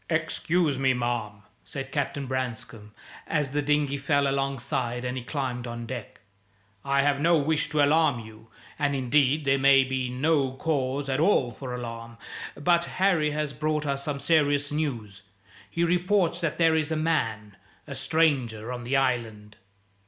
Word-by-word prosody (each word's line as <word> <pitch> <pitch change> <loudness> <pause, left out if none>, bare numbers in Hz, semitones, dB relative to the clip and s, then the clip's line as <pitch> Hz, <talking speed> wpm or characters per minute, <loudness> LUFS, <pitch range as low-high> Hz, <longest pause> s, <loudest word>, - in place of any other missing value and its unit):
"Excuse 160 -2 0
me, 130 -1 +3
ma'am," 120 -4 -3 0.2
said 135 -1 -7
Captain 140 0 -2
Branscome, 120 -4 -5 0.4
as 150 -4 0
the 145 +1 0
dinghy 145 -1 +1
fell 140 0 +2
alongside 130 -3 -2
and 125 0 -2
he 130 - -4
climbed 125 -3 -3
on 120 0 -6
deck. 120 -2 -7 0.6
"I 140 0 +2
have 140 -1 +2
no 165 +3 +4
wish 155 +1 0
to 150 -2 +2
alarm 145 -4 +3
you, 110 0 -14 0.3
and, 145 -1 +1
indeed, 140 +3 +2
there 135 0 +3
may 135 0 +6
be 130 -1 -2
no 135 +1 +1
cause 135 -1 -1
at 135 +1 0
all 155 -8 +3
for 125 +2 -7
alarm. 115 -1 -7 0.4
But 170 +3 +2
Harry 180 -6 +1
has 150 -1 -2
brought 150 0 -1
us 140 -1 -2
some 145 -1 -3
serious 145 -2 +2
news. 120 -10 -3 0.5
He 170 - -1
reports 175 0 +1
that 165 -3 -1
there 165 -1 +4
is 155 -1 0
a - - +1
man 115 -10 -1 0.3
a - - -7
stranger 125 -8 0
on 125 - -5
the 125 +3 0
Island." 115 -5 -1
140 Hz, 160 wpm, -26 LUFS, 125-150 Hz, 0.6 s, may